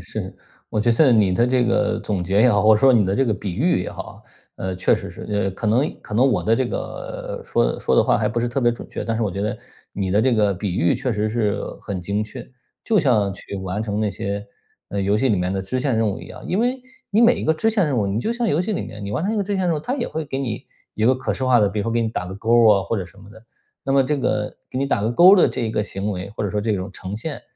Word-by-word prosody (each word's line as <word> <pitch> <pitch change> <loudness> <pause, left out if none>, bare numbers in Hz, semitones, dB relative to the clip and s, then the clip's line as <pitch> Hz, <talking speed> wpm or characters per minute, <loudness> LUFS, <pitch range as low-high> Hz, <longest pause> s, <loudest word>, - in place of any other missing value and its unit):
是， - - -6 0.3
我 105 - -1
觉 120 - +2
得 130 +2 +5
你 105 -5 +4
的 120 +6 +2
这 125 -1 +2
个 115 - +1
总 100 -4 -2
结 95 +4 +1
也 125 +2 +6
好， 105 -2 +2
或 110 0 +6
者 105 - 0
说 135 -1 +6
你 115 -4 +4
的 95 +1 0
这 135 - +2
个 110 - +1
比 95 -2 -5
喻 140 - +2
也 - - -5
好。 - - -9 0.3
呃， 95 -1 -4
确 90 - +3
实 - - -6
是， - - -10
呃， 105 -2 0
可 95 +4 -5
能 125 +8 +1
可 105 - -8
能 125 +5 +4
我 - - 0
的 110 - +3
这 130 +2 0
个 - - -6
说 - - 0
说 - - +1
的 - - +6
话 - - +2
还 - - 0
不 120 - -2
是 120 - 0
特 135 +3 -2
别 120 -1 +3
准 120 - -8
确， - - -5
但 115 -1 -1
是 115 - -1
我 105 - 0
觉 95 - -4
得 105 - -2 0.4
你 95 -2 -2
的 105 +3 +3
这 130 -1 +3
个 105 -2 +2
比 95 -1 -3
喻 85 +1 +2
确 125 - -2
实 105 +1 -1
是 105 -2 0 0.2
很 100 -3 -5
精 100 +4 -1
确。 115 +3 -9 0.4
就 220 -3 +2
像 110 - +2
去 100 - -8
完 95 +3 -3
成 105 -1 -2
那 105 -2 0
些， 100 +2 -4 0.4
呃， 100 - -3
游 100 +2 +2
戏 130 +5 +1
里 105 - +2
面 90 +1 -1
的 95 - -1
支 130 +7 -3
线 130 -4 0
任 110 -1 +2
务 100 - -4
一 - - -10
样。 - - -11
因 185 - -1
为 250 +2 0 0.3
你 215 +3 +3
每 240 +1 +6
一 - - -4
个 160 - +3
支 220 +8 +1
线 205 -5 +2
任 135 -4 -1
务， 100 - +1
你 100 +3 -1
就 230 - -1
像 240 -1 -1
游 150 - +2
戏 210 +4 -2
里 - - -2
面。 105 -1 -8
你 100 - -5
完 160 - -1
成 210 - 0
一 - - -1
个 205 - +1
支 200 +1 -2
线 185 - 0
任 170 - +2
务， 150 - -4
它 250 - -2
也 240 - -2
会 160 0 -4
给 135 -2 -4
你 130 -1 -4 0.3
一 110 - -1
个 130 +3 +5
可 130 - -2
视 130 - -3
化 125 -2 +4
的， 100 - +3
比 105 - -4
如 - - -1
说 115 - -1
给 115 - +1
你 115 - 0
打 90 -4 -4
个 95 - -7
勾 115 +2 +4
啊， 100 -2 +4
或 110 +6 -2
者 95 - -3
什 100 - -20
么 100 - -14
的。 110 - -14 0.4
那 135 - 0
么 135 0 +5
这 150 +3 0
个 105 -6 -1 0.2
给 130 - -3
你 140 - 0
打 125 - 0
个 110 - +1
勾 180 +10 +8
的 180 - +5
这 - - -4
一 110 - -1
个 105 - 0
行 100 0 -4
为， 95 0 -5
或 105 - -5
者 100 - -1
说 105 +1 -1
这 110 0 0
种 95 0 -4
呈 95 +2 -6
现， 145 +6 -5
110 Hz, 340 characters per minute, -21 LUFS, 100-135 Hz, 0.4 s, 勾